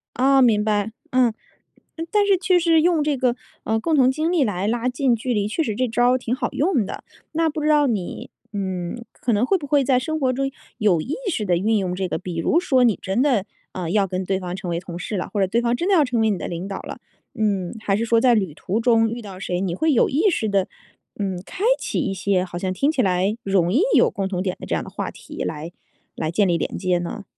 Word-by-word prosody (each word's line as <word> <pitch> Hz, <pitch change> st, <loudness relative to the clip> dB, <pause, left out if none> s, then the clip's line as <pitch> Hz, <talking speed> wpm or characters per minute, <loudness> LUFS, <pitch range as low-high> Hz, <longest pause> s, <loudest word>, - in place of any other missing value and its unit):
哦， 270 Hz, +2 st, +4 dB
明 220 Hz, -4 st, +4 dB
白。 210 Hz, 0 st, 0 dB, 0.2 s
嗯， 250 Hz, -3 st, +3 dB, 0.8 s
但 415 Hz, -1 st, +3 dB
是 395 Hz, -2 st, +4 dB
确 360 Hz, 0 st, +3 dB
实 330 Hz, -2 st, +4 dB
用 335 Hz, -3 st, +3 dB
这 295 Hz, -2 st, 0 dB
个， 250 Hz, -1 st, +1 dB, 0.3 s
呃， 220 Hz, 0 st, 0 dB
共 320 Hz, +6 st, 0 dB
同 260 Hz, -2 st, +5 dB
经 310 Hz, +5 st, -1 dB
历 330 Hz, -6 st, +3 dB
来 200 Hz, -3 st, -1 dB
拉 240 Hz, +2 st, 0 dB
近 255 Hz, -1 st, +1 dB
距 245 Hz, +2 st, -2 dB
离 205 Hz, -1 st, 0 dB
确 270 Hz, +10 st, -1 dB
实 220 Hz, -, -2 dB
这 255 Hz, +2 st, 0 dB
招 245 Hz, +2 st, +3 dB
儿 255 Hz, -, +3 dB
挺 245 Hz, -1 st, -2 dB
好 255 Hz, -2 st, -2 dB
用 290 Hz, -, +1 dB
的。 -, -, -7 dB, 0.3 s
那 325 Hz, 0 st, +1 dB
不 305 Hz, 0 st, -4 dB
知 305 Hz, -, 0 dB
道 295 Hz, -2 st, +4 dB
你， 205 Hz, -7 st, -3 dB, 0.2 s
嗯， 190 Hz, +3 st, -4 dB
可 240 Hz, -, -2 dB
能 210 Hz, +5 st, +2 dB
会 385 Hz, -, +2 dB
不 300 Hz, -, -7 dB
会 285 Hz, -1 st, +3 dB
在 255 Hz, 0 st, +3 dB
生 315 Hz, +4 st, -3 dB
活 260 Hz, -3 st, +2 dB
中 270 Hz, +1 st, -2 dB, 0.3 s
有 200 Hz, -8 st, +2 dB
意 265 Hz, -, -3 dB, 0.2 s
识 215 Hz, -8 st, -2 dB
地 175 Hz, -2 st, +2 dB
运 215 Hz, +4 st, +1 dB
用 180 Hz, -2 st, -1 dB
这 190 Hz, 0 st, -2 dB
个， -, -, -2 dB
比 180 Hz, -2 st, -6 dB
如 310 Hz, -, +2 dB
说， 260 Hz, -8 st, +3 dB
你 230 Hz, -4 st, +3 dB
真 195 Hz, +6 st, 0 dB
的， 245 Hz, -9 st, +2 dB, 0.3 s
呃， 175 Hz, -3 st, -4 dB
要 200 Hz, +1 st, +2 dB
跟 185 Hz, 0 st, -3 dB
对 190 Hz, +1 st, -1 dB
方 180 Hz, -1 st, -5 dB
成 190 Hz, -2 st, -6 dB
为 170 Hz, 0 st, -1 dB
同 175 Hz, -1 st, -8 dB
事 205 Hz, -, -4 dB
了， 180 Hz, -, -3 dB
或 205 Hz, -, 0 dB
者 190 Hz, -, +3 dB
对 235 Hz, +5 st, +1 dB
方 235 Hz, 0 st, +1 dB
真 345 Hz, +9 st, -2 dB
的 -, -, +4 dB
要 305 Hz, -4 st, +5 dB
成 240 Hz, -3 st, 0 dB
为 220 Hz, -, +3 dB
你 200 Hz, -, 0 dB
的 -, -, -5 dB
领 175 Hz, +3 st, -5 dB
导 195 Hz, -, -5 dB
了， -, -, -8 dB, 0.3 s
嗯， 200 Hz, -5 st, -1 dB
还 200 Hz, -2 st, 0 dB
是 230 Hz, -, -1 dB
说 230 Hz, 0 st, +3 dB
在 245 Hz, -2 st, +5 dB
旅 190 Hz, -8 st, 0 dB
途 190 Hz, +7 st, -2 dB
中 225 Hz, -1 st, +3 dB
遇 235 Hz, +1 st, -5 dB
到 195 Hz, -3 st, -9 dB
谁， 180 Hz, -1 st, -2 dB
你 185 Hz, -3 st, -1 dB
会 315 Hz, -, +2 dB
有 -, -, +3 dB
意 330 Hz, +10 st, +3 dB
识 230 Hz, -, -1 dB
地， 195 Hz, -2 st, +1 dB, 0.5 s
嗯， 190 Hz, -3 st, -2 dB
开 380 Hz, -, -7 dB, 0.2 s
启 -, -, -2 dB
一 -, -, -1 dB
些 190 Hz, -1 st, 0 dB
好 175 Hz, -1 st, -6 dB
像 185 Hz, 0 st, -2 dB
听 275 Hz, +11 st, +1 dB
起 280 Hz, -, +1 dB
来 190 Hz, +1 st, +1 dB
容 190 Hz, -2 st, +1 dB
易 280 Hz, -, +4 dB
有 -, -, +5 dB
共 195 Hz, -1 st, -2 dB
同 180 Hz, -2 st, -2 dB
点 185 Hz, -2 st, -2 dB
的 -, -, -7 dB
这 -, -, 0 dB
样 -, -, -2 dB
的 -, -, -9 dB
话 -, -, -4 dB
题 -, -, -8 dB
来 160 Hz, +2 st, -5 dB, 0.4 s
来 155 Hz, -, -2 dB
建 200 Hz, +3 st, +2 dB
立 175 Hz, -, +2 dB
连 -, -, -3 dB
接 180 Hz, -2 st, +1 dB
呢？ 175 Hz, +3 st, -5 dB
220 Hz, 285 characters per minute, -22 LUFS, 190-265 Hz, 0.8 s, 同